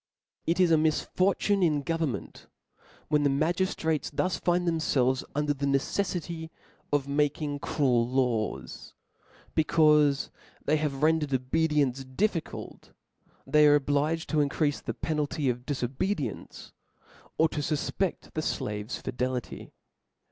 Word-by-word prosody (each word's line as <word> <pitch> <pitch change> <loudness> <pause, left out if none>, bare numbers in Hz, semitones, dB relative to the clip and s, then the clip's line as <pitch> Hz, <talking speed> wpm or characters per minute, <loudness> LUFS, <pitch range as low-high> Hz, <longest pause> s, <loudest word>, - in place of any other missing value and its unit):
It 170 +3 +1
is 180 -2 +4
a 160 - +5
misfortune 185 +5 +1
in 150 -5 +2
government 160 - -3 0.6
when 150 -1 +3
the 145 - +3
ma 150 +5 +2
giftrates 165 -4 -1
thus 185 -1 0
find 175 0 +1
themfelves 135 -6 +1
under 150 0 +1
a - - -1
neceffity 160 +4 -1 0.4
of 145 -2 +1
making 145 0 0
cruel 125 -5 +1
laws: 125 -4 -2 0.6
becaufe 150 -3 +3 0.3
they 155 +2 +3
have 150 -2 -2
rendered 155 -3 +2
obedience 140 0 +1
difficult, 165 +6 -3 0.5
they 150 0 +5
are 145 - +7
obliged 145 +3 0
to 155 - +1
increafe 145 0 +1
the - - -4
penalty 150 -3 -1
of 125 +1 -8
difobedience, 140 - -3 0.7
or 160 - +5
to 150 - -4
fu{j)e£t 155 +5 -1
the 155 - -1
Qave's 105 -5 -3
fi - - -4
delity. 125 0 -3
150 Hz, 125 wpm, -28 LUFS, 135-160 Hz, 0.7 s, are